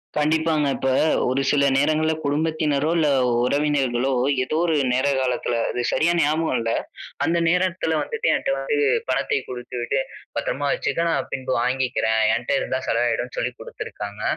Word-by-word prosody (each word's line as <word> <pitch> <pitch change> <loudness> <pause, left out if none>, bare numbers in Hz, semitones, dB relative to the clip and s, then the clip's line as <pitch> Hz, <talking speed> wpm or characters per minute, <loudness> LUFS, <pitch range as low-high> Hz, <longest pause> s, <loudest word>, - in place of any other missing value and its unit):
கண்டிப்பாங்க. 155 0 +1
இப்ப, 135 - -1 0.4
ஒரு 130 +2 +1
சில 140 -1 +3
நேரங்கள்ல 155 +3 +2
குடும்பத்தினரோ, 150 0 0
இல்ல, 160 -2 +3 0.4
உறவினர்களோ 135 -2 +1 0.3
ஏதோ 155 +4 -2
ஒரு 165 -2 +1 0.2
நேர, 130 +3 +1
காலத்துல 125 -1 -1
அது 125 - -2
சரியா 160 +5 +2
ஞாபகம் 155 0 +1
இல்ல. 115 0 -1 0.5
அந்த 170 +1 +1
நேரத்துல 180 -1 +1
வந்துட்டு, 460 0 -2
என்ட்ட - - -4
வந்து 450 - -1 0.3
பணத்தை 435 - +1
கொடுத்துவிட்டு, 125 +1 -3 0.4
பத்தரமா 145 +1 -1
வச்சிக்க, 155 +4 -1
நான் - - -1
பின்பு 130 0 -3
வாங்கிக்கிறேன். 125 -4 0 0.2
என்ட்ட - - -5
இருந்தா 130 - -2
செலவு 115 +1 +1
ஆயிடுனு 120 +1 -3
சொல்லி 125 - -1
குடுத்துருக்காங்க. 105 -2 -7
140 Hz, 140 wpm, -23 LUFS, 125-160 Hz, 0.5 s, சில